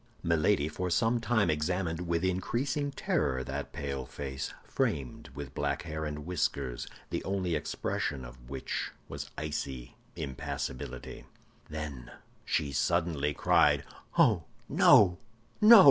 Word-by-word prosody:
Milady 85 -1 +3
for 90 +4 -3
some 115 +7 +3
time 115 -5 +2
examined 85 +2 -1
with 85 +1 +1
increasing 130 +10 0
terror 65 - 0
that - - -4
pale 70 -2 -3
face, 65 -1 -4
framed 65 -4 -2
with 70 -2 -6
black - - -1
hair 80 -1 -4
and 75 0 -4
whiskers, 70 -8 -1 0.2
the - - -1
only 95 -3 -1
expression 75 -2 -2
of - - -13
which 65 -1 -3 0.2
was - - -6
icy 70 -5 -4 0.2
impassibility. 65 -1 -5 0.4
Then 75 -5 -5 0.3
she 70 -2 0
suddenly 75 -1 +1
cried, - - +4 0.3
"Oh, - - +5 0.2
no, 90 -3 +6 0.4
no!" 220 +1 +11
75 Hz, 120 wpm, -31 LUFS, 70-90 Hz, 0.4 s, no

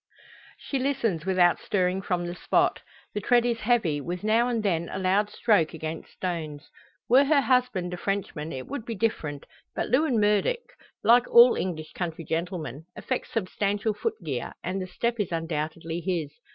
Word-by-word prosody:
She 275 - -3
listens 230 - -1
without 180 -2 +4
stirring 185 -1 0
from 180 -2 -1
the 175 - -4
spot. 180 - +1 0.3
The 210 - -2
tread 240 +3 +3
is 235 -1 0
heavy, 215 -11 +1
with 175 +6 -5
now 225 +3 +3
and 235 -3 -1
then 170 -4 0
a - - -4
loud 195 +2 +2
stroke 200 -8 +2
against 160 0 -6
stones. 160 -5 -5 0.4
Were 265 +4 +6
her 290 0 +4
husband 250 -10 +1
a - - -4
Frenchman 175 -5 -3
it 130 -1 -5
would 280 -3 -5
be 230 0 -5
different. 155 -10 -2 0.3
But - - -2
Lewin 255 -1 +3
Murdock, 210 - +1 0.3
like 240 +3 +5
all 240 +1 +8
English 155 -4 -4
country 165 -2 -4
gentlemen, 160 -3 -4
affects 255 - -3
substantial 205 +1 -1
foot 440 - -2
gear; - - -4
and 190 +1 -2
the 185 - -4
step 235 +5 -2
is 200 -4 -1
undoubtedly 165 0 -3
his. 165 -4 -2
190 Hz, 170 wpm, -26 LUFS, 165-235 Hz, 0.4 s, all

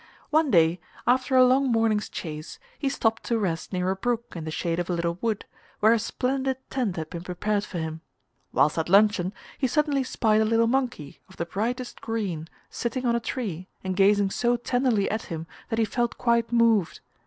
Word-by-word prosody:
One 310 -1 +3
day, 170 -3 +4 0.3
after 255 +2 +2
a 255 0 +8
long 260 +1 +3
morning's 225 -2 +1
chase 155 -2 -6 0.2
he 280 - 0
stopped 225 -4 0
to 235 - +1
rest 170 -7 -2
near 185 0 0
a - - -1
brook 235 +3 -2
in 165 -2 -5
the - - -4
shade 165 +2 -2
of 175 - -3
a - - +1
little 170 0 -1
wood, 225 -3 -1 0.3
where 220 +2 +6
a 230 - +2
splendid 265 +3 -1
tent 240 -9 -1
had 160 -2 -5
been 170 - -5
prepared 200 +3 -1
for 185 - -6
him. 160 -1 -4 0.5
Whilst 150 - +3
at 160 - -2
luncheon 200 -2 +4 0.3
he 265 - +2
suddenly 285 +1 +1
spied 220 -4 +2
a - - +3
little 230 +1 +3
monkey 245 - -1
of 190 - -16
the 170 - -2
brightest 240 +8 -3
green 195 -9 -3 0.2
sitting 250 +2 -3
on 235 -1 +3
a - - +2
tree 200 -7 -4 0.2
and 190 -1 -2
gazing 200 0 +4
so 240 +2 +1
tenderly 245 -4 +1
at 220 +1 -2
him 165 -3 -5 0.2
that 225 - -1
he 225 - +3
felt 240 +3 -1
quite 235 -1 +1
moved. 230 -6 +3
220 Hz, 200 wpm, -26 LUFS, 180-245 Hz, 0.5 s, a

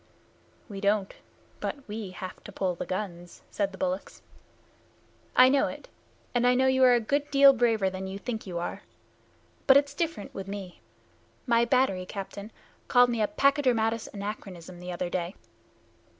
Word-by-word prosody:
"We 195 -3 -7
don't, 200 -1 +1 0.5
but 280 -2 -5
we 210 -2 -5
have 185 0 -8
to 205 - -8
pull 190 -2 -1
the 170 - -6
guns," 175 -3 -5
said 200 -1 -1
the 190 - -11
bullocks. 280 +1 -3 1.1
"I 255 - +8
know 275 +1 +3
it, - - -9 0.4
and 245 0 +2
I 250 - +4
know 260 +1 +3
you 260 0 +3
are 250 -1 +6
a - - +3
good 285 +6 -1
deal 275 0 +7
braver 225 -5 +2
than 190 0 -4
you 190 +1 -5
think 220 0 -5
you 175 -2 -4
are. 170 - -4 0.9
But 270 -1 +8
it's 285 0 +1
different 310 -9 -3
with 195 0 -6
me. 195 -3 -7 0.6
My 235 -2 +3
battery 235 -8 +1
captain 200 +2 -7 0.4
called 245 0 +5
me 230 -2 -1
a 210 - +3
Pachydermatous 240 -6 +1
Anachronism 190 -4 -7
the 180 0 -6
other 175 0 -3
day." 180 +1 -3
215 Hz, 165 wpm, -28 LUFS, 190-255 Hz, 1.1 s, I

